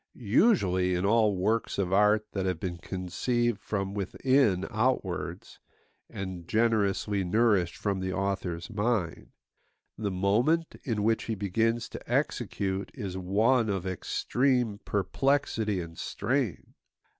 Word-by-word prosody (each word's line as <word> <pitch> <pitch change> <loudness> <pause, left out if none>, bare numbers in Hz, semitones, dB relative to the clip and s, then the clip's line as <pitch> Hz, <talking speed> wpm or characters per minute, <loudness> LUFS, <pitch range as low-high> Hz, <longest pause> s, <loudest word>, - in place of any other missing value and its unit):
Usually 100 - +2
in 90 +2 0
all 110 -1 +3
works 110 +5 0
of 95 -2 0
art 105 +2 +4
that 95 -2 -2
have 90 -3 -1
been 85 -1 -4
conceived 100 +6 -1
from 95 -2 -3
within 105 0 +1
outwards, 95 -6 -2 0.5
and 95 -3 -6
generously 105 -3 +1
nourished 100 -2 +2
from 100 -2 -1
the 95 0 -2
author's 95 -1 -2
mind, 105 -6 -1 0.7
the 105 -2 -1
moment 110 - +1
in 110 -6 -1
which 110 +1 +1
he 115 - -2
begins 115 +4 0
to - - -9
execute 95 0 -1
is 95 -3 -5
one 110 +6 +2
of 95 -2 -2
extreme 120 +4 0
perplexity 110 0 0
and 85 -2 -7
strain. 130 -7 -2
100 Hz, 120 wpm, -28 LUFS, 95-115 Hz, 0.7 s, art